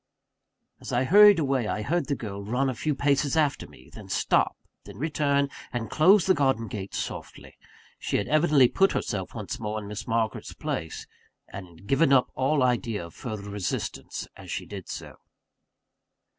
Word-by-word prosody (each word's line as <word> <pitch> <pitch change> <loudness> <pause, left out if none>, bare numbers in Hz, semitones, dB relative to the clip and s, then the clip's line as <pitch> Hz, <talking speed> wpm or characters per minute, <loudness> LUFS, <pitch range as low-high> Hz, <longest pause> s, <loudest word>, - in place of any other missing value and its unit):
As - - -8
I 120 +1 +2
hurried 205 +7 +8
away, 135 -7 0
I 105 0 -2
heard 170 +9 0
the 140 - 0
girl 100 -5 -6
run 125 +6 0
a - - -4
few 145 +5 -2
paces 140 +2 +1
after 150 -3 +1
me 70 -3 -17
then - - -11
stop - - +1 0.3
then - - -12
return, 140 -1 +1 0.2
and 120 -2 -4
close 185 +4 +5
the 190 - +5
garden 135 -7 +1
gate, 100 -3 -6
softly. - - -6 0.4
She - - -1
had 100 - -2
evidently 150 -4 +5
put 195 +9 +2
herself 95 -2 -3
once 105 -4 -5
more 110 -1 -3
in 105 - -8
Miss 105 +1 -6
Margaret's 110 -1 -1
place; 80 0 -4 0.4
and 95 -2 -8
had 85 +2 -17
given 140 +1 +3
up 130 -2 +4
all 135 +1 +1
idea 115 -6 0
of 85 - -13
further 105 -3 -6
resistance 100 -2 -4
as - - -12
she - - -4
did - - -9
so. - - -8
125 Hz, 175 wpm, -26 LUFS, 105-145 Hz, 0.4 s, hurried